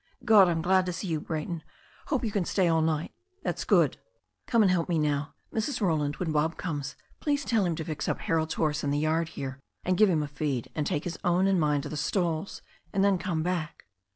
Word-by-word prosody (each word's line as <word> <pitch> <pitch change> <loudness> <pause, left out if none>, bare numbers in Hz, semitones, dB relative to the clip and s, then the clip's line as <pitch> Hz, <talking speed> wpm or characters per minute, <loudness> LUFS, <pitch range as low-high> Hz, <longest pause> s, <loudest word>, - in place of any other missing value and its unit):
"God! 210 -4 +7
I'm 165 -1 0
glad 185 +1 +3
to 180 - -1
see 185 +1 -4
you, 160 -2 0
Brayton. 160 +1 -4 0.5
Hope 260 -5 0
you 215 - -1
can 200 -2 0
stay 185 +1 +1
all 165 -1 +3
night? 155 0 0 0.3
That's - - -2
good. - - +3 0.5
Come 230 -3 +4
and 190 - +4
help 175 -1 +1
me 170 - +2
now. 150 -1 0 0.2
Mrs. 240 +4 -1
Roland, 155 -7 +1
when 175 -3 -2
Bob 155 +2 +1
comes, 145 -5 -4 0.2
please 290 -1 0
tell 225 -4 +2
him 170 - 0
to 160 - -5
fix 155 -2 -4
up - - -2
Harold's 160 -1 0
horse 150 -1 0
in 145 - 0
the 145 - +1
yard 155 +2 +1
here, 135 0 -5 0.2
and 185 - +1
give 215 -2 +7
him 160 -4 +2
a - - -3
feed, 140 -4 -3
and 150 -2 -1
take 145 - -1
his 175 - -5
own 180 +2 +3
and 195 -2 +3
mine 150 -2 +2
to - - -6
the 155 - -5
stalls, 170 +2 -1 0.3
and 195 - +1
then 200 -2 +3
come 170 -4 -1
back." 175 -3 -3
165 Hz, 235 wpm, -28 LUFS, 150-185 Hz, 0.5 s, God